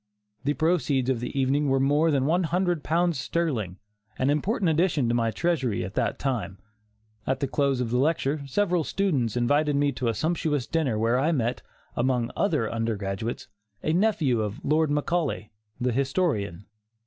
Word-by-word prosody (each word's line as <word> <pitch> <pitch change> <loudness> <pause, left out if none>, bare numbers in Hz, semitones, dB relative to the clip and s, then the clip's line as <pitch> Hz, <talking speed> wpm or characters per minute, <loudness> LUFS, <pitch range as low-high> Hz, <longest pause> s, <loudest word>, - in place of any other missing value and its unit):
The 145 +1 +1
proceeds 145 -4 +1
of 125 - -1
the 125 +3 -3
evening 140 +2 +2
were 135 0 +3
more 145 +4 +3
than 140 -3 +2
one 175 +4 +2
hundred 175 -1 0
pounds 170 -2 +1
sterling, 125 - -2 0.4
an 130 +2 +2
important 185 - +1
addition 160 -5 +2
to 115 - +1
my 115 -1 +1
treasury 130 - 0
at 95 - -7
that - - 0
time. 105 -9 -2 0.7
At 130 0 0
the 140 - 0
close 140 -1 +1
of 120 -2 -2
the 125 - +2
lecture, 150 0 +1
several 180 +2 +1
students 140 - 0
invited 145 +4 +2
me 145 0 +2
to 125 -2 -3
a 115 - 0
sumptuous 155 - 0
supper 145 -8 0
where 115 +3 +2
I 150 +5 +2
met, 120 -6 -1 0.3
among 125 -1 0
other 155 - +1
undergraduates, 110 -1 -3 0.4
a 155 - +1
nephew 165 - +2
of 105 0 -5
Lord 155 +1 +2
Macaulay, 150 -6 -1 0.3
the 125 0 0
historian. 130 - -1
140 Hz, 170 wpm, -26 LUFS, 120-160 Hz, 0.7 s, were